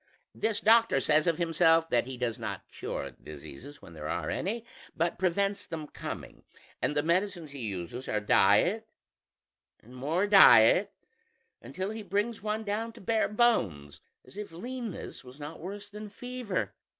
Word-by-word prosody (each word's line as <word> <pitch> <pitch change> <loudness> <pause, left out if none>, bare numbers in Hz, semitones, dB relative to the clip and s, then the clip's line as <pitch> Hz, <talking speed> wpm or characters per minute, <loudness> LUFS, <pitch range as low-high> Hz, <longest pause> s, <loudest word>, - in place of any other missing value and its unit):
This 220 -1 -1
doctor 225 -8 +5
says 155 +4 +2
of 165 -2 +2
himself 165 -1 +3
that 120 0 +2
he 130 -1 -6
does 120 -1 -2
not 115 - -5
cure - - -5
diseases 75 - -11
when 85 - -12
there 75 -1 -6
are - - -2
any, 225 +5 -3 0.3
but 170 +1 0
prevents 195 +2 0
them 160 -2 -5
coming, - - -8 0.4
and 150 - 0
the 145 - +2
medicines 170 -2 0
he 140 - -8
uses 100 +7 -6
are 105 - +1
diet 105 - +3 0.9
and 125 +3 -16
more 155 +9 0
diet, 205 - +7 0.7
until 190 +2 -4
he 220 0 -6
brings 205 +3 -1
one 215 +1 -2
down 220 +2 -2
to 235 - -14
bare 220 +3 +1
bones; 95 - +1 0.2
as - - -15
if 210 -3 -6
leanness 235 - -6
was 130 +3 -14
not 150 +2 -7
worse 200 +4 -7
than 210 +1 -9
fever. 245 -2 -4
175 Hz, 160 wpm, -29 LUFS, 135-210 Hz, 0.9 s, diet